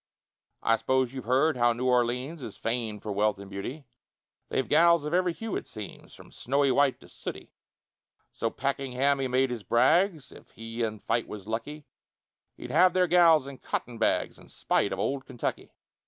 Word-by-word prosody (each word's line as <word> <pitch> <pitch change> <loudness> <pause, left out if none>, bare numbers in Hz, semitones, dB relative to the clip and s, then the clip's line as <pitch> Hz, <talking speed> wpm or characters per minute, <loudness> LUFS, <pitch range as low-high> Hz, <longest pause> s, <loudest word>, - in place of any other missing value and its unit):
I 115 - +3
s'pose 130 +2 0
you've 130 -4 -7
heard 135 +5 +3
how 120 -1 +3
New 125 +2 -2
Orleans 125 +5 0
Is 110 - -8
famed 115 -3 -3
for 105 - -4
wealth 105 0 +1
and 100 0 -11
beauty; 125 +10 -6 0.6
They've 130 - -1
gals 170 0 +4
of 150 - -3
every 180 0 +2
hue, 220 +6 -5
it - - -4
seems, 105 -3 -10
From - - -15
snowy 140 +1 +1
white 140 0 +2
to - - -15
sooty: - - -8 0.8
So 115 - -2
Pakenham 135 +1 0
he 135 - 0
made 130 +1 +1
his 120 -3 -4
brags 150 - +2
If - - -15
he 115 +1 -7
in 110 -2 -1
fight 115 0 -1
was 105 -3 -8
lucky, 130 +8 -5 0.7
He'd - - -8
have 180 +3 +5
their 185 -1 +3
gals 170 -5 +5
and 140 -1 -10
cotton 120 -2 -4
bags, 115 - 0
In - - -16
spite - - 0
of - - -3
Old 135 -1 -2
Kentucky. 120 -3 -4
130 Hz, 185 wpm, -28 LUFS, 115-150 Hz, 0.8 s, have